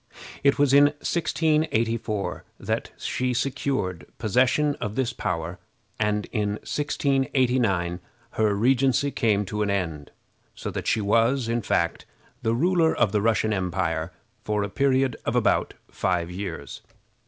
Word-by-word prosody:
It 140 0 +4
was 140 -1 +3
in 140 +1 +8
1684 145 - 0 0.2
that - - -2
she 125 -1 -1
secured 130 -8 -2
possession 130 +6 +2
of 105 0 -3
this 130 -1 0
power, 85 -2 -3 0.4
and 105 -1 +1
in 105 -3 0
1689 130 -11 0 0.3
her 105 -2 +1
regency 135 +5 +2
came 105 -5 +1
to 105 +3 -3
an 105 - +1
end, 85 -7 -2 0.5
so - - -5
that - - -5
she 110 - +2
was, 115 +5 +2
in 115 +1 0
fact, 85 -4 -1 0.3
the 115 -1 +1
ruler 165 +3 +3
of 100 - +2
the 105 -1 +1
Russian 110 0 +2
empire 90 -3 -1 0.3
for 105 -1 0
a 100 - -3
period 135 0 +1
of - - -1
about - - +2
five 90 -2 -1
years. 90 -7 -6
115 Hz, 135 wpm, -25 LUFS, 100-135 Hz, 0.5 s, in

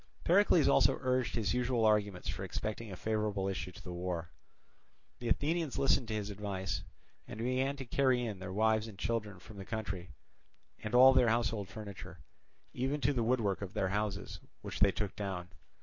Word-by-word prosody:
Pericles 180 -3 +5
also - - +5
urged 130 -1 +1
his 110 -5 0
usual 125 -2 +1
arguments 105 -4 +2
for - - -3
expecting 110 0 -4
a - - -5
favourable 105 -2 -1
issue 95 -1 -3
to 85 - -13
the 90 -2 -6
war. 85 -1 -3 0.9
The 120 - -4
Athenians 160 +1 0
listened 135 -3 +3
to 110 - -2
his 105 -1 -3
advice, 95 -3 -3 0.5
and - - -8
began 130 +4 0
to 135 -2 -7
carry 125 -1 +2
in 105 -5 -4
their 95 0 -6
wives 110 +2 +2
and 105 -4 -10
children 105 -1 -2
from 100 +3 -13
the 95 - -6
country, 95 -5 -4 0.7
and 105 +2 -2
all 130 +2 +9
their 125 -3 +5
household 110 -4 0
furniture, 100 -2 -8 0.6
even 135 +4 -1
to 140 +3 +2
the 125 - 0
woodwork 115 -5 +1
of 100 +2 -6
their 95 -3 +1
houses 100 -2 -2 0.2
which - - -5
they 100 -1 +5
took 105 0 -3
down. 95 -3 -4
110 Hz, 180 wpm, -33 LUFS, 95-125 Hz, 0.9 s, all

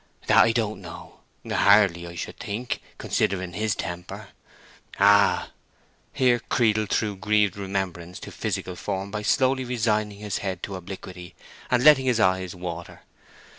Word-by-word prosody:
"That - - +3
I 115 - +6
don't 110 -2 -2
know—hardly, 100 -4 +1
I 85 - -9
should - - -6
think, 115 +5 -4 0.2
considering 95 -2 -1
his 105 +2 -1
temper. 90 0 -6 0.7
Ah!" 100 0 +4 0.6
Here 125 -3 +2
Creedle 110 -2 +1
threw 105 -1 0
grieved 105 0 +1
remembrance 95 -3 -4
into - - -9
physical 90 - -4
form 95 +1 -4
by 105 0 -3
slowly 130 +4 +2
resigning 110 -4 -1
his 105 -2 -4
head 95 -3 -4
to 100 - -4
obliquity 90 -1 -9 0.3
and 125 -1 +2
letting 140 -3 +6
his 120 -3 +2
eyes 95 -3 +1
water. 85 -1 -7
100 Hz, 135 wpm, -25 LUFS, 95-110 Hz, 0.7 s, I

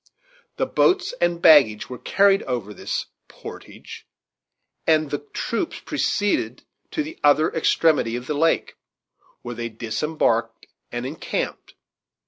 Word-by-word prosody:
The - - +1
boats 365 -5 +2
and 175 0 +1
baggage 135 -10 +6
were 125 -2 -8
carried 195 0 +3
over 120 -5 -3
this - - -3 0.2
"portage," - - -11 0.8
and 155 -2 +3
the 145 - -1
troops 230 - -4
proceeded 205 0 -1 0.3
to 305 - -2
the 315 +3 -9
other 150 +2 +4
extremity 155 -7 +2
of 125 0 -5
the 150 - -2
lake, 165 +3 +1 0.7
where 120 - -5
they 115 0 -4
disembarked 115 0 -1 0.3
and 120 +1 -4
encamped. 150 +4 -4
145 Hz, 120 wpm, -23 LUFS, 120-170 Hz, 0.8 s, baggage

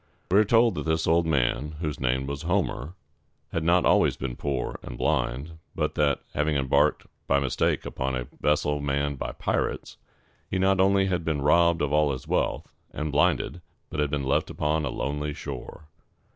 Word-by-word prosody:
We 100 - +6
are - - +6
told 115 +1 +4
that 85 - -4
this 80 0 +1
old 85 +1 +3
man, 70 0 0
whose 75 -3 -3
name 65 +1 0
was 70 +3 -5
Ho´mer, 90 -3 -1 0.6
had 85 - -1
not 85 +2 +3
always - - +3
been 65 -2 -4
poor 70 -2 -3
and - - -8
blind, 75 +9 -1 0.2
but - - -1
that, 75 -2 +1
having 75 +1 0
embarked 70 -2 +2 0.2
by 70 - +3
mistake 70 -2 0
upon 65 0 -2
a 65 -1 -3
vessel 75 0 +1
manned 70 -1 -1
by - - -4
pirates, - - -2 0.5
he 95 - -1
not 95 0 +2
only 95 0 +4
had 90 -3 -1
been 75 -4 -1
robbed 85 +2 +4
of 75 0 -1
all 75 -1 +3
his 65 - -7
wealth, - - -1 0.2
and 75 0 -3
blinded, 75 +4 +1 0.3
but 75 - -4
had 75 -1 +1
been 70 -1 -2
left 70 - +1
upon 75 +1 0
a - - -1
lonely 75 +2 -3
shore. 75 - -8
75 Hz, 185 wpm, -26 LUFS, 70-85 Hz, 0.6 s, We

